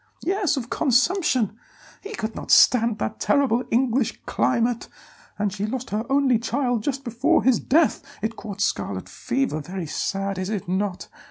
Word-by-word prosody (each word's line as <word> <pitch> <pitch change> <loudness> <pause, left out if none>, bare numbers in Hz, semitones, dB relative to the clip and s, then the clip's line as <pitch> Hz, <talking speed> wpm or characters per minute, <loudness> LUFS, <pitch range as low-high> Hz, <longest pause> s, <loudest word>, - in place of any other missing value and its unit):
"Yes, 380 -5 +1
of 245 -2 -5
consumption; 260 - +2 0.4
he 420 +2 -7
could 220 - -4
not - - -7
stand 235 -4 +5
that 210 +1 -3
terrible 260 -4 +2
English 245 0 +1
climate. 235 -1 0 0.5
And 205 -2 -1
she 210 0 -3
lost 255 +2 -5
her 215 +3 -2
only 270 -4 +3
child 245 -1 0
just 275 +3 -3
before 255 +7 +2
his 260 -2 +4
death; 310 +2 +2 0.2
it 220 +1 -1
caught 205 -3 -7
scarlet 95 - -1
fever. 245 - -2
Very 180 +2 -5
sad, 195 +4 -2
is 185 +1 -3
it 210 -5 -3
not? 190 +1 -2
235 Hz, 160 wpm, -24 LUFS, 205-270 Hz, 0.5 s, stand